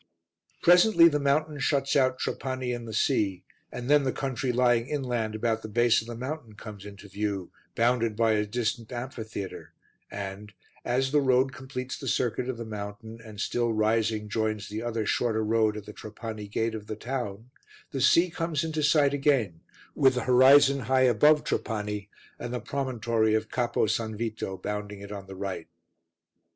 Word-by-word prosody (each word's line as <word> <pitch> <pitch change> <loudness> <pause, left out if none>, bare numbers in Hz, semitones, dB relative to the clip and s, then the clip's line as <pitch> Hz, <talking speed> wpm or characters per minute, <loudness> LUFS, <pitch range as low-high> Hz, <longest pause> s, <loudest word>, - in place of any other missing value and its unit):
Presently 175 0 +7
the 150 -2 0
mountain 145 +1 0
shuts 140 0 +1
out 130 -2 +3
Trapani 130 -2 -3
and 120 -1 -6
the - - -6
sea, 105 -5 0 0.3
and 125 - -6
then 145 +1 +5
the 135 -1 0
country 130 -1 -2
lying 120 -1 +2
inland 120 -7 -2
about 110 0 0
the 110 - -7
base 120 +1 +3
of 110 - -12
the 120 - -6
mountain 130 -2 -6
comes 105 -1 -10
into 100 0 -11
view 100 -2 -3 0.2
bounded 115 -2 +2
by 115 0 +3
a 105 -1 +1
distant 115 +1 -2
amphitheatre 115 -5 -6 0.4
and, 100 +1 -7 0.3
as 130 +2 0
the 150 0 +4
road 130 0 +2
completes 130 -1 -6
the - - -6
circuit 125 +1 0
of 130 - -3
the 115 - -6
mountain, 110 +2 -7
and 110 -2 -11
still 120 +2 0
rising 110 0 +1
joins 110 -1 -2
the 105 +2 -4
other 115 -2 -2
shorter 110 0 0
road 110 -1 +2
at 105 - -8
the 105 - -9
Trapani 110 0 -7
gate 110 +2 -1
of 105 -1 -7
the 110 - -4
town, 120 -2 -5 0.4
the 135 - -3
sea 170 +6 +4
comes 165 -2 -2
into 160 -1 -2
sight 145 -1 +4
again, 135 - +1 0.3
with 130 -2 +4
the 125 - -1
horizon 135 +2 +6
high 130 0 +4
above 150 +6 +4
Trapani 105 -2 -3 0.3
and 120 - -5
the 125 - -2
promontory 115 -4 0
of 110 0 -1
Capo 120 -1 0
S. 110 - +1
Vito 110 -3 -4
bounding 105 +1 -5
it 100 0 -9
on 100 -2 -7
the 95 - -9
right. 95 0 -5
115 Hz, 175 wpm, -27 LUFS, 105-130 Hz, 0.4 s, Presently